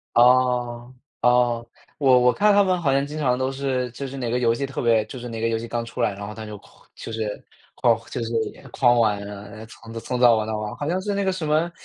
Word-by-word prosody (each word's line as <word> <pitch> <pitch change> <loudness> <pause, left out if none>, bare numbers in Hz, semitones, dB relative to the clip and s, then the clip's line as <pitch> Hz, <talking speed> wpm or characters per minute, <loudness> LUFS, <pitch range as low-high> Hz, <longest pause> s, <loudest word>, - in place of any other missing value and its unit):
哦， 125 0 +3 0.3
哦， 120 -1 +2 0.3
我 135 -3 +5
我 125 0 +4
看 210 0 +3
他 200 0 +5
们 185 -1 +1
好 140 -5 +1
像 140 +1 +1
经 150 +1 -6
常 125 -4 +1
都 130 +1 -1
是 130 -2 -2
就 140 +2 -6
是 135 - -8
哪 125 -3 -3
个 125 - +1
游 120 -2 +3
戏 140 +4 -3
特 135 - -5
别 115 -2 +3
就 130 - -8
是 120 0 -7
哪 115 -1 -6
个 115 - 0
游 115 - 0
戏 115 +1 -7
刚 120 0 -2
出 115 - -8
来， 105 - +2
然 100 +1 -7
后 105 - -7
他 110 0 -8
就 105 -1 -7
狂 - - -22
就 - - -8
是， 110 -2 -4 0.3
狂 - - +3
就 120 - -3
是 115 0 -4 0.2
也 - - -17
狂 120 -2 +4
玩 105 -3 +2
啊， 100 0 -8
呃， 110 +2 -10
从 115 0 -13
早 115 - -5
从 125 +2 -3
早 120 -2 +7
玩 110 -1 -1
到 110 0 -2
晚。 105 0 -4
好 145 - -4
像 180 +3 0
是 205 +1 -2
那 200 0 0
个 190 - +2
什 180 -4 -4
么 155 +3 +1
125 Hz, 300 characters per minute, -23 LUFS, 115-135 Hz, 0.3 s, 早